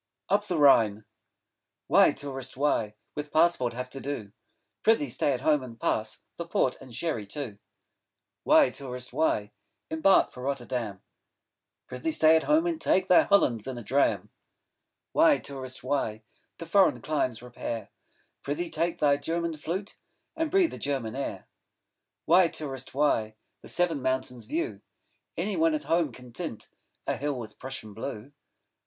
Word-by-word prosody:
'UP 205 +1 +4
THE 180 -4 -1
RHINE' 110 -8 +5 0.8
Why, - - +6
Tourist, 135 -2 -7
why 115 -7 +1 0.2
With 150 0 -5
Passport 155 -7 +3
have 125 +1 -5
to 135 - -7
do? 135 -8 -5 0.5
Pr'ythee 180 - +3
stay 145 - +1
at 125 -2 -2
home 150 0 +3
and 115 -3 -10
pass 110 -1 -1 0.2
The 170 - -5
Port 130 -6 +1
and 130 - -12
Sherry 115 -4 -3
too. 110 -3 -6 0.8
Why, - - +5
Tourist, 125 -2 -7
why 105 -9 +1 0.4
5 160 - -1
Embark 190 +4 +5
for 125 - -10
Rotterdam? 125 -6 -3 0.8
Pr'ythee 125 +6 -3
stay 160 +1 +6
at 160 - +2
home 310 +2 +3
and 335 -2 -1
take 190 0 +2
Thy 180 - +8
Hollands 125 - +2
in 130 -2 -4
a 120 - -7
dram. 135 +7 +1 0.8
Why, 310 -2 +5
Tourist, 130 -2 -7
why 115 -5 -1 0.3
To 165 - -7
foreign 190 +3 +4
climes 130 -6 -1
repair? 120 -2 -5 0.5
10 145 - -2
Pr'ythee 170 +1 -4
take 170 0 0
thy 145 -2 +4
German 170 +1 -2
Flute, 180 +7 -5 0.4
And 325 -1 -1
breathe 370 -2 +3
a - - -7
German 135 -6 -2
air. 140 - -4 0.8
Why, 175 +2 +6
Tourist, 135 -5 -6
why 115 -7 +1 0.3
The - - -12
Seven 170 -5 +1
Mountains 130 -3 -2
view? 115 -7 -3 0.6
Any 200 +5 -1
one 325 -1 +3
at 305 - -3
home 165 -4 +1
can 125 0 -13
tint 155 -7 -5
15 - - -25 0.3
A - - -1
hill 145 -1 -2
with 115 -3 -8
Prussian 130 -5 -7
Blue. 115 +3 -6
140 Hz, 160 wpm, -28 LUFS, 120-165 Hz, 0.8 s, Thy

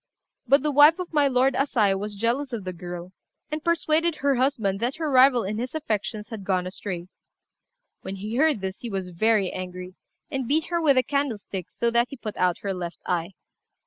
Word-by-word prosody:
But 275 +2 +5
the 300 - +1
wife 295 +3 +7
of 360 -2 -6
my 295 -2 +4
lord 265 0 +3
Asai 230 -8 +2
was 205 +2 -4
jealous 240 +6 -1
of 220 -4 -3
the 185 0 -5
girl, 175 0 -7 0.4
and 305 0 -3
persuaded 335 -1 +1
her 280 -1 +1
husband 240 -7 0
that 240 +4 -1
her 315 -2 -2
rival 255 -2 +6
in 210 +3 -3
his 250 +5 -4
affections 215 -6 -3
had 220 -4 -7
gone 185 -2 0
astray; 185 -1 -5 0.9
when 195 - -6
he 210 +4 -5
heard 300 -6 +3
this 190 0 -4
he 240 - -6
was 190 -3 -3
very 200 +2 +2
angry, 180 0 -7 0.4
and 265 -3 -2
beat 310 +4 +2
her 340 -1 0
with 285 -4 +4
a 255 - +5
candlestick 230 - -3
so 235 0 -1
that 235 +1 +3
he 275 - -8
put 215 -3 -6
out 180 -1 +1
her 200 -1 -1
left 175 -2 -5
eye. 175 +1 -1
230 Hz, 205 wpm, -25 LUFS, 190-280 Hz, 0.9 s, wife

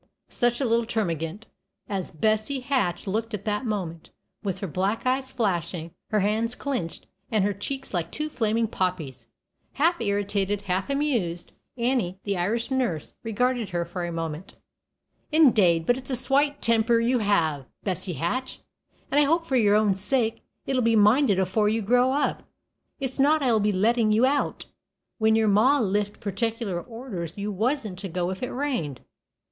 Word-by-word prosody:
Such 240 0 +1
a 275 - +1
little 235 0 +2
termagant 185 -3 -2 0.4
as 195 -3 -3
Bessie 215 - 0
Hatch 250 -10 0
looked 220 +3 -2
at 200 - -9
that 210 +3 -1
moment, 175 -6 -4 0.3
with 195 -4 -2
her 195 - -4
black 195 +8 -1
eyes 260 +1 0
flashing, 175 -7 -2 0.2
her 215 -1 +2
hands 220 +4 0
clinched, 250 - -4 0.2
and 215 -3 +2
her 205 +1 +1
cheeks 265 +7 -5
like 170 -2 -2
two 305 - -3
flaming 230 -5 0
poppies! 160 - -3 0.5
Half 330 +1 +2
irritated, 205 -1 -1
half 190 +4 -1
amused, 240 - -1 0.3
Annie, 235 -7 0
the 200 -1 -1
Irish 220 +8 -1
nurse, 240 - -1
regarded 240 0 0
her 175 -1 -1
for 175 +1 -5
a 175 - -3
moment. 165 +1 -5 0.8
"Indade, 210 - +5
but 245 - +3
it's 260 - -6
a 260 - +1
swate 285 +3 +2
timper 230 0 +3
you 240 +2 +2
have, 160 - +1 0.2
Bessie 185 -2 -2
Hatch; 205 - -3 0.5
and 285 - +4
I 295 - +5
hope 330 +3 +2
for 270 - -1
your 210 -4 +4
own 210 -2 +4
sake 225 +4 0 0.2
it'll 260 -2 +1
be 230 -1 +3
minded 215 +1 +5
afore 190 +3 +2
you 220 0 0
grow 245 +4 +3
up. 285 +2 0 0.6
It's 265 -1 -3
not 295 +2 +4
I 250 - +3
will 220 - +3
be 210 0 +2
lettin' 215 +3 +2
you 220 +4 +4
out, 285 +2 0 0.5
when 220 0 +4
your 220 -1 +3
ma 230 +8 +4
lift 205 -1 -1
particular 210 -2 -2
orders 225 -9 -6
you 205 +1 -3
wasn't 215 -2 -1
to 195 -1 -5
go 180 +1 -1
if 190 - -6
it 250 - -2
rained. 245 - -2
215 Hz, 170 wpm, -25 LUFS, 185-250 Hz, 0.8 s, Indade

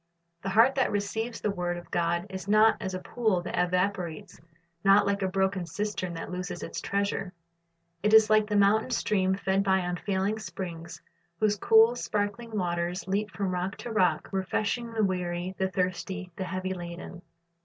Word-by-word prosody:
The 195 - -3
heart 225 +7 +5
that 265 -2 +1
receives 220 +3 -2
the 210 - 0
word 175 -2 -2
of 175 - -11
God 170 +1 0
is 190 0 -6
not 215 +2 +5
as 190 -3 -3
a - - -3
pool 210 -3 0
that - - -4
evaporates, 180 -2 -1 0.4
not 200 +1 +6
like 200 0 0
a 190 - +1
broken 190 0 0
cistern 200 -3 -3
that 165 - -6
loses 180 0 -5
its - - -5
treasure. 200 -2 -2 0.7
It 210 - +2
is 220 0 +8
like 215 -1 +4
the 210 - -1
mountain 205 +4 +4
stream 190 -5 +1
fed 190 +1 0
by 190 -1 +3
unfailing 190 +3 -1
springs, 175 -4 -7 0.4
whose 210 -1 +3
cool, 225 +3 +5
sparkling 215 0 -3
waters 175 0 -2
leap 205 +2 0
from 190 0 -2
rock 180 +2 -2
to 240 - -7
rock, 185 -5 +2
refreshing 205 +5 -1
the 225 -1 0
weary, 180 -1 -1
the 190 0 +1
thirsty, 185 0 -3
the 190 - -4
heavy 185 +1 -3
laden. 175 0 -8
190 Hz, 175 wpm, -28 LUFS, 180-210 Hz, 0.7 s, is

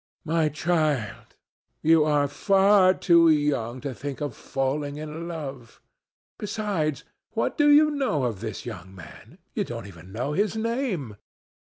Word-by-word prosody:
"My 160 -1 +1
child, 155 - -1 0.5
you 160 0 +5
are 145 -2 +2
far 195 +3 +4
too 170 -2 +5
young 145 -6 +1
to 140 -2 -4
think 140 +2 -6
of 145 -4 -4
falling 140 +2 -2
in 155 +2 -6
love. 140 -8 -7 0.6
Besides, 195 - -2 0.3
what - - -1
do 295 -2 +4
you 305 +1 +6
know 265 - 0
of 115 -6 -2
this 110 +1 -6
young 95 -5 -8
man? 85 -5 -13 0.2
You - - 0
don't - - -6
even 90 -1 -12
know 125 +8 -3
his 205 +4 0
name. 220 - -2
150 Hz, 145 wpm, -25 LUFS, 130-185 Hz, 0.6 s, you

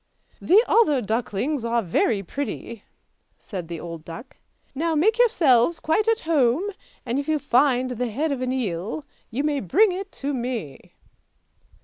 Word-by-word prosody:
" - - -36
The 420 +5 +8
other 360 - +4
ducklings 235 +4 -2
are 235 0 0
very 195 +3 +1
pretty," 235 0 -5 0.5
said 185 -6 -7
the 170 -1 -6
old 165 -1 -8
duck. 170 - -10 0.2
" - - -44
Now 320 +4 -1
make 435 +10 +2
yourselves 325 - +4
quite 415 +8 +1
at 455 0 +2
home, 290 -1 +2 0.4
and 245 +2 -1
if 280 - -4
you 310 -1 +2
find 255 -2 +2
the 250 0 -2
head 290 +8 -1
of 270 -2 -2
an 255 0 -1
eel 225 - -3 0.2
you 250 +5 -2
may 295 -2 0
bring 375 - +3
it 385 +2 -5
to 285 +1 -3
me! 235 - -5
255 Hz, 165 wpm, -24 LUFS, 230-315 Hz, 0.5 s, The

